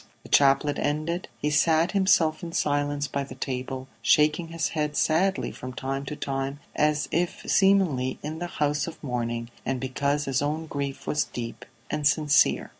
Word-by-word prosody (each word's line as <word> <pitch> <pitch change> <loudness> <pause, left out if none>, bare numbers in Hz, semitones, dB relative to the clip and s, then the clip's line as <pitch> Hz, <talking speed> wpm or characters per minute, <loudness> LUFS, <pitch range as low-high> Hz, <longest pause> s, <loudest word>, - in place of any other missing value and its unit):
The - - -13
chaplet 140 +1 +4
ended, 155 +4 -1
he 150 - -1
sat 160 +3 +3
himself 190 -5 +3
in 170 -1 -6
silence 145 -1 0
by 140 +1 -2
the 135 -2 -9
table, 130 0 -4
shaking 155 +3 +3
his 165 -2 -2
head 150 -2 -2
sadly 190 +5 +2
from 130 0 -8
time 135 +2 -3
to 150 - -5
time 135 0 -3 0.2
as 150 0 +2
is 175 +1 +2 0.2
seemly 180 -10 +3
in 155 +2 -5
the 175 - -3
house 150 -2 0
of 165 - -7
mourning, 120 -2 -3
and 130 0 -2
because 140 +3 -1
his 135 -1 0
own 155 +3 -1
grief 140 -2 -4
was 150 - +1
deep 115 -1 -7 0.3
and 150 -1 +1
sincere. 145 -1 +3
145 Hz, 170 wpm, -26 LUFS, 135-155 Hz, 0.3 s, chaplet